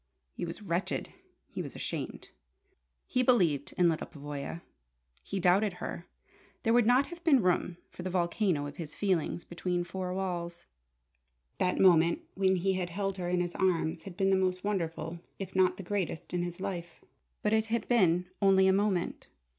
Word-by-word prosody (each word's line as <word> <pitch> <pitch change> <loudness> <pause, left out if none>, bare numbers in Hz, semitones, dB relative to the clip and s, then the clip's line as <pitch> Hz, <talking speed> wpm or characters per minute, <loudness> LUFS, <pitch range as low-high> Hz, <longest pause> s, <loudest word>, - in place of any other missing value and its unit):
He - - -4
was 170 +5 -7
wretched. 175 -1 -2 0.3
He - - -6
was - - -7
ashamed. - - -5 0.8
He 255 - +1
believed 180 - +2
in 180 - +5
Lyda 160 -2 0
Pavoya. 145 +3 -6 0.6
He 195 - -4
doubted 190 +3 +3
her. 175 -1 -6 0.6
There 225 - +3
would 240 -2 +5
not 255 +3 +5
have 345 0 -10
been 275 - +5
room 180 -1 +1
for - - -9
the 185 - -3
volcano 175 -3 +1
of 145 - -8
his 155 -3 -6
feelings 180 -4 0
between 175 0 -2
four 180 +1 -4
walls. 175 -2 -3 0.9
That 180 - +1
moment 170 -3 +5
when 190 0 +2
he 190 +2 +1
had 185 -2 -2
held 195 +2 -2
her 175 -1 -3
in 180 0 +2
his 175 0 -2
arms 170 -3 +1
had 185 -1 -10
been 195 0 +3
the - - +5
most 185 -1 0
wonderful 170 -4 -2 0.2
if 190 -1 -7
not 185 -1 +3
the 195 - -6
greatest 185 -4 -3
in 175 - +1
his 175 0 -4
life. 175 -3 -5 0.4
But 210 - +2
it 220 0 +3
had 230 +1 -1
been 180 -7 +3 0.2
only 190 -1 +5
a 190 - +5
moment. 195 -3 0
180 Hz, 180 wpm, -30 LUFS, 170-195 Hz, 0.9 s, in